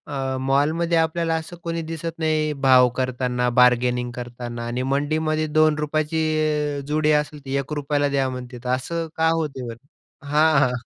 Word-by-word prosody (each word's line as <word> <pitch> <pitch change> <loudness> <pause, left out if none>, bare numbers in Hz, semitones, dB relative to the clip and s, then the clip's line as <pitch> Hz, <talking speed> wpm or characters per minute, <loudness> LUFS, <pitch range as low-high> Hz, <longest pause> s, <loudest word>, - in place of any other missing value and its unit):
अ, 135 -1 -2
मॉलमध्ये 160 +5 +2
आपल्याला 165 0 +1
असं 175 - -10
कोणी 165 0 -2
दिसत 165 0 -5
नाही 155 -1 +1 0.2
भाव 125 -1 +7
करतांना 125 -1 0
बार्गेनिंग 125 0 +3
करतांना 120 -1 -6
आणि 125 +2 -2
मंडीमध्ये 155 +2 0
₹2 155 0 +2
ची 160 0 0 0.6
अ, - - -5
जुडी 155 0 +2
असेल 150 -2 -11
ती 135 +1 -3
₹1 145 +1 -2
ला 145 - +3
द्या 135 -1 +1
म्हणतील 125 -1 -8
तर 125 - -4
असं 165 +6 -4
का 160 0 +3
होतो? 140 -6 -3
बरं 140 +4 -15
हां, 155 0 +4
हां. 130 -3 +3
145 Hz, 165 wpm, -23 LUFS, 125-155 Hz, 0.6 s, भाव